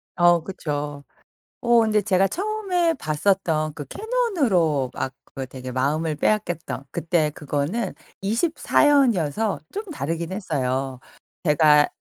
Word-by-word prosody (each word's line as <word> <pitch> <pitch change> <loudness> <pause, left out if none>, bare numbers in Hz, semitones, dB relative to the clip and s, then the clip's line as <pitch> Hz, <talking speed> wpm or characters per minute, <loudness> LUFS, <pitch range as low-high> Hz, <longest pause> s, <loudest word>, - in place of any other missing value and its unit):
어 175 -1 +5
그쵸. 145 -5 -4 0.6
어 240 -1 +5
근데 215 -1 +2
제가 195 -1 +3
처음에 370 - 0
봤었던 155 - 0
그 145 - -7
캐논으로 265 - +1
막 130 - -3
그거 135 -1 -6
되게 130 0 -8
마음을 150 +5 0
빼앗겼던 175 -6 -1
그때 165 -2 +1
그거는 150 - -2 0.3
24 265 - +2
현이어서 220 - +2
좀 415 - -3
다르긴 165 - -3
했어요. 135 - -2 0.4
제가 150 -2 +5
170 Hz, 245 characters per minute, -23 LUFS, 145-225 Hz, 0.6 s, 어